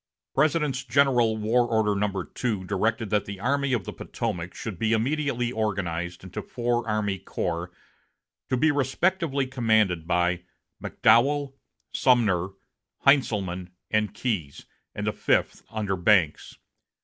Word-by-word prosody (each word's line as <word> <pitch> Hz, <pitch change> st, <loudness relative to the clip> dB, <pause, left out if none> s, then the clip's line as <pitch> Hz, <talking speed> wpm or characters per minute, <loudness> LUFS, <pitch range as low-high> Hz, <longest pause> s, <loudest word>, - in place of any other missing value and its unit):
President's 150 Hz, -2 st, +1 dB
General 125 Hz, -3 st, +3 dB
War 115 Hz, +3 st, +2 dB
Order 110 Hz, -2 st, +2 dB
No. 100 Hz, -2 st, -1 dB
2 110 Hz, -4 st, -3 dB
directed 105 Hz, +3 st, -1 dB
that 105 Hz, -1 st, +2 dB
the 100 Hz, -1 st, -7 dB
Army 140 Hz, +5 st, 0 dB
of 120 Hz, -6 st, 0 dB
the -, -, -7 dB
Potomac 85 Hz, 0 st, -4 dB
should 110 Hz, -6 st, -6 dB
be 110 Hz, 0 st, +1 dB
immediately 125 Hz, 0 st, 0 dB
organized 90 Hz, -6 st, -2 dB
into 95 Hz, 0 st, -6 dB
four 120 Hz, -2 st, -2 dB
army 105 Hz, -3 st, -1 dB
corps, 90 Hz, -2 st, -3 dB, 0.8 s
to 130 Hz, -, +1 dB
be 155 Hz, +5 st, +3 dB
respectively 145 Hz, +1 st, 0 dB
commanded 110 Hz, -10 st, +1 dB
by 90 Hz, 0 st, +1 dB, 0.4 s
McDowell, 140 Hz, +3 st, +3 dB, 0.4 s
Sumner, 105 Hz, -9 st, +3 dB, 0.6 s
Heintzelman, 95 Hz, -10 st, +2 dB, 0.2 s
and 110 Hz, -2 st, +1 dB
Keyes, 105 Hz, -, -3 dB, 0.3 s
and -, -, -3 dB
a -, -, +2 dB
fifth -, -, 0 dB
under 105 Hz, -3 st, -2 dB
Banks. 90 Hz, -4 st, +2 dB
110 Hz, 125 wpm, -26 LUFS, 95-130 Hz, 0.8 s, General